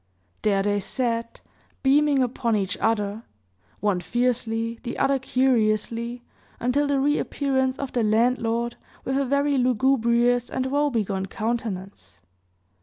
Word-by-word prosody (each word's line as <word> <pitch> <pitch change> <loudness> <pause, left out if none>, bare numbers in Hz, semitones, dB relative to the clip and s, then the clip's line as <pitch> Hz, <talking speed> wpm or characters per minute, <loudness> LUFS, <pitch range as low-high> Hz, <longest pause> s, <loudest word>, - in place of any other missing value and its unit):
There 200 -2 +2
they 205 0 +1
sat, 230 +1 -3 0.4
beaming 280 0 +4
upon 235 -2 0
each 195 -2 -1
other 210 -1 0 0.6
one 205 -3 +1
fiercely, 230 +2 -1
the 240 - -5
other 275 0 +2
curiously, 235 -2 0 0.4
until 275 +4 +1
the 285 -1 +1
re 290 +2 +2
appearance 265 -2 0
of 275 -2 -4
the 245 - +1
landlord 230 +1 +1 0.3
with 265 - -1
a 275 0 +1
very 280 +1 +2
lugubrious 245 -1 +2
and 260 - -2
woebegone 230 -9 0
countenance. 205 - -4
240 Hz, 120 wpm, -24 LUFS, 220-265 Hz, 0.6 s, beaming